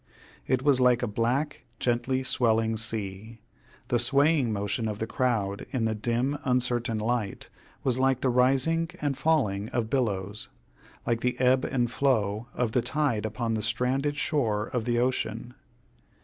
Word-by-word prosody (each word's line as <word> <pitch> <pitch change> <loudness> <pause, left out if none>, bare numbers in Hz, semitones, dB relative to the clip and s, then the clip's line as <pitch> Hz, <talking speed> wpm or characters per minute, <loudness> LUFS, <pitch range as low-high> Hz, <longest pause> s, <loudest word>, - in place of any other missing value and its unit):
It 130 0 +1
was 140 -3 +4
like 125 -1 +4
a - - +1
black, 125 +8 -1 0.2
gently 125 +2 0
swelling 115 -3 +2
sea. 110 0 -4 0.5
The 120 - +2
swaying 140 +1 +3
motion 105 +2 -2
of 105 -1 -3
the 110 - -2
crowd, 110 -5 -1
in 125 -5 -1
the 110 - +1
dim 120 +6 -1
uncertain 125 -3 +1
light, 110 -2 -2 0.3
was 130 -1 +1
like 130 -1 +2
the 130 - +2
rising 135 +7 +2
and 145 -2 -1
falling 110 -11 +1
of 115 -2 -2
billows 105 -6 -2 0.6
like 115 -1 0
the 125 0 -1
ebb 130 0 +3
and 120 -2 0
flow 115 -5 0
of 120 -3 0
the 125 - +2
tide 130 -7 0
upon 115 +1 -2
the 110 - -1
stranded 130 +7 0
shore 115 -9 0
of 120 -3 -1
the 120 -1 +1
ocean. 120 -1 -1
120 Hz, 155 wpm, -27 LUFS, 110-130 Hz, 0.6 s, was